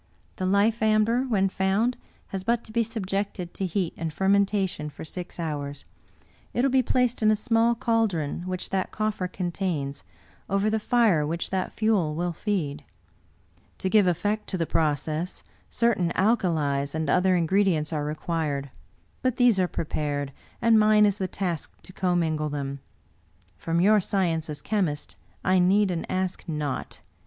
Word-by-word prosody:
The 185 Hz, -, -1 dB
life 205 Hz, +4 st, +2 dB
amber, 220 Hz, +3 st, +3 dB
when 195 Hz, -4 st, +3 dB
found, 195 Hz, +6 st, +1 dB, 0.3 s
has 190 Hz, -1 st, -4 dB
but 235 Hz, +3 st, +1 dB
to -, -, -13 dB
be 235 Hz, +1 st, +2 dB
subjected 200 Hz, -4 st, -3 dB
to 190 Hz, -, -2 dB
heat 180 Hz, -1 st, -1 dB
and 165 Hz, -1 st, -3 dB
fermentation 195 Hz, -3 st, +1 dB
for 150 Hz, -, -9 dB
six 180 Hz, +2 st, -8 dB
hours; 145 Hz, -3 st, -4 dB, 0.7 s
it 245 Hz, -, +2 dB
will 275 Hz, -, +3 dB
be 265 Hz, 0 st, +4 dB
placed 250 Hz, -1 st, +1 dB
in 215 Hz, -, +4 dB
a 215 Hz, -, +5 dB
small 230 Hz, +1 st, +2 dB
caldron 215 Hz, -11 st, 0 dB
which 185 Hz, 0 st, -4 dB
that 190 Hz, -1 st, 0 dB
coffer 215 Hz, -4 st, -2 dB
contains, 175 Hz, -6 st, -3 dB, 0.5 s
over 200 Hz, +2 st, +1 dB
the 220 Hz, -, +1 dB
fire 215 Hz, -8 st, +3 dB
which 165 Hz, +3 st, -3 dB
that 190 Hz, -1 st, -1 dB
fuel 200 Hz, -9 st, +1 dB
will 175 Hz, +1 st, -1 dB
feed. 155 Hz, -7 st, -2 dB, 0.9 s
To 190 Hz, -, -2 dB
give 210 Hz, -4 st, +5 dB
effect 205 Hz, +5 st, 0 dB
to 190 Hz, -, -2 dB
the 165 Hz, -, 0 dB
process, 155 Hz, +3 st, -1 dB, 0.3 s
certain 200 Hz, -8 st, +1 dB
alkalies 160 Hz, -10 st, +1 dB
and 160 Hz, 0 st, -1 dB
other 185 Hz, 0 st, +3 dB
ingredients 170 Hz, -2 st, +2 dB
are 150 Hz, -1 st, -1 dB
required; 150 Hz, -2 st, -2 dB, 0.5 s
but 255 Hz, -2 st, +1 dB
these 245 Hz, -6 st, +4 dB
are 180 Hz, -, +3 dB
prepared, 145 Hz, -4 st, -3 dB, 0.3 s
and 230 Hz, -1 st, +6 dB
mine 215 Hz, 0 st, +5 dB
is 205 Hz, -1 st, +1 dB
the 190 Hz, -, 0 dB
task 180 Hz, -4 st, -4 dB
to 185 Hz, -, -13 dB
commingle 165 Hz, -5 st, 0 dB
them. 140 Hz, -1 st, -4 dB, 0.8 s
From 165 Hz, 0 st, -1 dB
your 210 Hz, +4 st, +5 dB
sci 195 Hz, -1 st, +1 dB
ence 160 Hz, -2 st, -2 dB
as 145 Hz, -1 st, -6 dB
chemist 180 Hz, -9 st, -1 dB, 0.3 s
I 185 Hz, 0 st, +3 dB
need 190 Hz, +2 st, +4 dB
and 170 Hz, -2 st, -4 dB
ask 185 Hz, -1 st, -2 dB
naught. 150 Hz, -4 st, -3 dB
185 Hz, 160 wpm, -26 LUFS, 160-215 Hz, 0.9 s, and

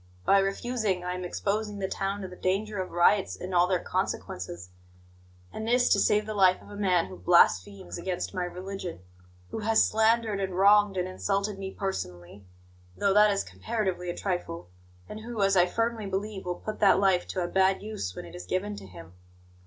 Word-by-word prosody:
By 195 Hz, -, +5 dB
refusing, 195 Hz, -1 st, -1 dB
I 180 Hz, 0 st, -2 dB
am 180 Hz, 0 st, -5 dB
exposing 205 Hz, +3 st, -2 dB
the 195 Hz, -1 st, -2 dB
town 195 Hz, +1 st, -3 dB
to 190 Hz, -, -5 dB
the 180 Hz, -, -11 dB
danger 200 Hz, +3 st, -1 dB
of 185 Hz, -, -5 dB
riots 180 Hz, +3 st, +3 dB
and 185 Hz, +1 st, -6 dB
all 175 Hz, 0 st, +4 dB
their 185 Hz, 0 st, +2 dB
consequences; 90 Hz, -, -4 dB, 0.8 s
and 220 Hz, -, -5 dB
this 245 Hz, +1 st, +3 dB
to -, -, +4 dB
save 210 Hz, 0 st, +3 dB
the 215 Hz, -, -4 dB
life 185 Hz, -3 st, +4 dB
of -, -, -15 dB
a -, -, -8 dB
man 185 Hz, -4 st, +2 dB
who 185 Hz, -, -10 dB
blasphemes 95 Hz, -, +3 dB
against 180 Hz, 0 st, -3 dB
my 185 Hz, -2 st, -2 dB
religion, 180 Hz, -, -6 dB, 0.5 s
who -, -, -4 dB
has 220 Hz, +1 st, +3 dB
slandered 220 Hz, -1 st, +2 dB
and 190 Hz, -2 st, -3 dB
wronged 205 Hz, 0 st, +5 dB
and 180 Hz, 0 st, 0 dB
insulted 195 Hz, +2 st, -2 dB
me 190 Hz, -1 st, -4 dB
personally 95 Hz, -, -5 dB, 0.5 s
(though 200 Hz, -1 st, +2 dB
that 210 Hz, +1 st, +6 dB
is 200 Hz, -1 st, 0 dB
comparatively 180 Hz, -, -3 dB
a 175 Hz, -, -4 dB
trifle), 90 Hz, -, -4 dB, 0.4 s
and 215 Hz, -, -7 dB
who, 225 Hz, -2 st, -3 dB
as 195 Hz, 0 st, +3 dB
I 180 Hz, -1 st, +5 dB
firmly 230 Hz, +1 st, -1 dB
believe, 195 Hz, 0 st, -4 dB
will 180 Hz, 0 st, -2 dB
put 215 Hz, +3 st, -6 dB
that 195 Hz, -2 st, +5 dB
life 190 Hz, -2 st, +2 dB
to 185 Hz, -, -2 dB
a -, -, -2 dB
bad 190 Hz, +2 st, +2 dB
use 205 Hz, -, -5 dB
when -, -, -7 dB
it 85 Hz, -, -12 dB
is 90 Hz, 0 st, -9 dB
given 205 Hz, -, -2 dB
to -, -, -10 dB
him. 85 Hz, -2 st, -12 dB
190 Hz, 200 wpm, -28 LUFS, 180-210 Hz, 0.8 s, that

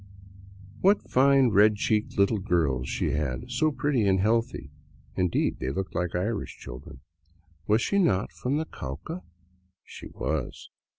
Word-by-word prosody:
What 200 Hz, +2 st, +3 dB
fine, 135 Hz, -1 st, +4 dB
red 105 Hz, 0 st, +5 dB
cheeked 105 Hz, +1 st, -1 dB
little 100 Hz, +2 st, +3 dB
girls 75 Hz, -10 st, 0 dB
she -, -, -1 dB
had, 75 Hz, -, -3 dB
so 155 Hz, +5 st, +2 dB
pretty 140 Hz, -7 st, 0 dB
and 95 Hz, -1 st, +3 dB
healthy. 110 Hz, -9 st, 0 dB, 0.4 s
(Indeed, 90 Hz, -2 st, 0 dB
they 65 Hz, -, -2 dB
looked 95 Hz, +8 st, -4 dB
like 90 Hz, 0 st, -2 dB
Irish 100 Hz, +5 st, -2 dB
children). 65 Hz, +2 st, -10 dB, 0.7 s
Was 110 Hz, +2 st, +3 dB
she 200 Hz, -, +1 dB
not 100 Hz, -, +1 dB
from 135 Hz, +4 st, -2 dB
the 160 Hz, -, -1 dB
Cauca? 90 Hz, -, -7 dB, 0.6 s
She -, -, -10 dB
was. -, -, -4 dB
105 Hz, 140 wpm, -27 LUFS, 85-125 Hz, 0.7 s, red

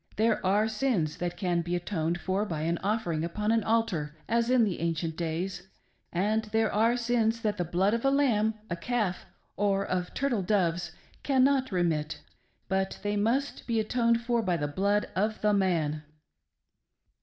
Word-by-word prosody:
There 220 Hz, +1 st, +1 dB
are 205 Hz, +3 st, +3 dB
sins 215 Hz, -, 0 dB
that 175 Hz, 0 st, -3 dB
can 175 Hz, -2 st, 0 dB
be 175 Hz, +1 st, -2 dB
atoned 175 Hz, -1 st, -2 dB
for 190 Hz, +3 st, -1 dB
by 165 Hz, -7 st, -3 dB
an 165 Hz, +2 st, 0 dB
offering 195 Hz, -6 st, -1 dB
upon 210 Hz, +6 st, -1 dB
an 225 Hz, -1 st, +2 dB
altai, 220 Hz, -9 st, +1 dB, 0.2 s
as 235 Hz, +1 st, +1 dB
in 250 Hz, -3 st, +5 dB
ancieift 165 Hz, -4 st, -2 dB
days; 175 Hz, +3 st, -3 dB, 0.4 s
and 210 Hz, +5 st, 0 dB
there 220 Hz, 0 st, 0 dB
are 230 Hz, +3 st, +3 dB
sins 230 Hz, -1 st, +1 dB
that 210 Hz, -3 st, 0 dB
the 175 Hz, -, 0 dB
blood 180 Hz, +5 st, +1 dB
of 230 Hz, -, -1 dB
a 270 Hz, -, +4 dB
lamb, 260 Hz, -7 st, +3 dB
of 220 Hz, -, -2 dB, 0.2 s
a -, -, +1 dB
calf, 210 Hz, -2 st, -2 dB, 0.3 s
or 200 Hz, -1 st, +1 dB
of 180 Hz, -1 st, -2 dB
turtle 270 Hz, -7 st, 0 dB
doves 175 Hz, -3 st, 0 dB, 0.3 s
cannot 265 Hz, -1 st, +3 dB
rehiit, 165 Hz, -5 st, 0 dB, 0.5 s
but 190 Hz, 0 st, -1 dB
they 205 Hz, 0 st, 0 dB
must 235 Hz, +7 st, 0 dB
be 230 Hz, -2 st, +1 dB
atoned 235 Hz, +1 st, +2 dB
for 235 Hz, 0 st, +1 dB
by 180 Hz, -5 st, 0 dB
the 145 Hz, -, -1 dB
blood 200 Hz, +7 st, +1 dB
of 215 Hz, +3 st, 0 dB
the 210 Hz, 0 st, +3 dB
man." 165 Hz, -6 st, +1 dB
205 Hz, 170 wpm, -28 LUFS, 175-225 Hz, 0.5 s, in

